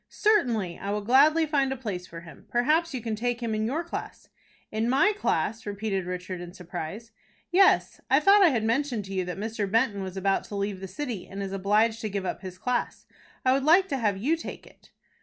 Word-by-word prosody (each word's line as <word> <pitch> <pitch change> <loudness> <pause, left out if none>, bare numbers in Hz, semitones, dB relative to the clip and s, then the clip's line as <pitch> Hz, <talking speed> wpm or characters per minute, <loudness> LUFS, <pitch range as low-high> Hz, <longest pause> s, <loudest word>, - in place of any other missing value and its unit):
"Certainly, 235 - +1
I 200 - -5
will 205 0 -2
gladly 295 +8 +5
find 280 -3 +1
a - - -1
place 195 -8 -5
for 165 0 -9
him. 165 -1 -14
Perhaps 310 +8 +2
you 260 -4 -4
can 225 -2 -2
take 240 +2 -2
him 230 -2 -2
in 215 0 0
your 305 +8 -1
class." 340 - -7 0.4
"In 220 +2 0
my 325 +12 +4
class!" 230 - -1
repeated 200 -2 -3
Richard, 180 0 -5
in 175 +1 -9
surprise. 180 +5 -7 0.4
"Yes, 380 +2 +4
I - - +5
thought 405 +1 +6
I 375 - +8
had 235 -7 0
mentioned 235 -1 0
to 195 - -7
you 185 -1 0
that 180 0 -5
Mr. 215 -1 -3
Benton 225 -2 +1
was 190 0 -6
about 195 0 +1
to 205 - -8
leave 200 -1 -2
the 190 - -6
city, 225 -1 -5
and 200 +1 -6
is 195 - -5
obliged 210 +4 +1
to 215 - -3
give 195 -1 -3
up - - -3
his 185 -2 -8
class. 250 +5 -2 0.4
I 255 - +5
would 270 0 +1
like 350 +6 +5
to 275 - -1
have 210 -5 0
you 275 +12 +1
take 330 - -8
it." - - -20
220 Hz, 225 wpm, -27 LUFS, 195-270 Hz, 0.4 s, I